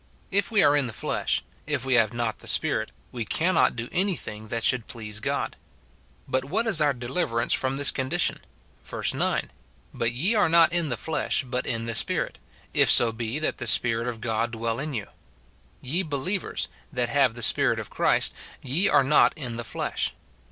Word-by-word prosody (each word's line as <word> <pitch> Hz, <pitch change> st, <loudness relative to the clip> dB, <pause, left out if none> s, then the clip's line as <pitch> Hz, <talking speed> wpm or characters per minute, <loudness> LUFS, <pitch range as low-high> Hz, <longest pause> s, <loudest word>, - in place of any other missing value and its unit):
If 200 Hz, +1 st, +2 dB
we 215 Hz, -3 st, +4 dB
are 145 Hz, -, +5 dB
in 145 Hz, -3 st, +1 dB
the 115 Hz, -, -7 dB
flesh, -, -, -1 dB, 0.2 s
if 140 Hz, -4 st, -1 dB
we 130 Hz, -, +1 dB
have 115 Hz, -3 st, +4 dB
riot 120 Hz, -2 st, -2 dB
the -, -, -11 dB
Spirit, -, -, +1 dB, 0.2 s
we 120 Hz, -2 st, -4 dB
cannot 170 Hz, +11 st, +2 dB
do 120 Hz, 0 st, -4 dB
any 190 Hz, +1 st, +1 dB
thing 110 Hz, -5 st, -7 dB
that 115 Hz, +1 st, -3 dB
should 125 Hz, -3 st, +2 dB
please 105 Hz, -3 st, -5 dB
God. -, -, -2 dB, 0.7 s
But 130 Hz, 0 st, 0 dB
what 210 Hz, +11 st, 0 dB
is 195 Hz, -9 st, +4 dB
our 145 Hz, -1 st, +4 dB
deliverance 120 Hz, -1 st, -1 dB
from 130 Hz, 0 st, +1 dB
this 140 Hz, 0 st, +5 dB
condition? 130 Hz, -1 st, 0 dB, 0.4 s
Verse -, -, -2 dB
9, -, -, -1 dB, 0.2 s
" -, -, -33 dB
But 115 Hz, 0 st, -1 dB
ye 165 Hz, -, 0 dB
are 205 Hz, -6 st, +3 dB
not 170 Hz, 0 st, +5 dB
in 170 Hz, -3 st, +1 dB
the 120 Hz, -, -2 dB
flesh, 160 Hz, +4 st, -1 dB
but 125 Hz, 0 st, -3 dB
in 115 Hz, -1 st, -2 dB
the 115 Hz, -, -2 dB
Spirit, 105 Hz, -2 st, +1 dB, 0.3 s
if -, -, +4 dB
so 120 Hz, -1 st, +5 dB
be 115 Hz, +3 st, -4 dB
that 155 Hz, -, -2 dB
the 120 Hz, -, -3 dB
Spirit 115 Hz, +1 st, +3 dB
of 115 Hz, -2 st, -5 dB
God 115 Hz, 0 st, -1 dB
dwell 115 Hz, 0 st, -3 dB
in 150 Hz, -1 st, -4 dB
you;" 105 Hz, -3 st, -3 dB, 0.5 s
— -, -, -35 dB, 0.3 s
"Ye 155 Hz, +9 st, -1 dB
believers, 165 Hz, +4 st, -3 dB, 0.2 s
that 125 Hz, -4 st, -1 dB
have 135 Hz, -3 st, +2 dB
the 120 Hz, -, -4 dB
Spirit -, -, +4 dB
of -, -, -8 dB
Christ, -, -, +2 dB, 0.3 s
ye 150 Hz, +10 st, +2 dB
are -, -, +5 dB
not 150 Hz, +4 st, +4 dB
in 125 Hz, -6 st, -5 dB
the 120 Hz, -, -4 dB
flesh." -, -, -3 dB
125 Hz, 200 wpm, -26 LUFS, 115-155 Hz, 0.7 s, are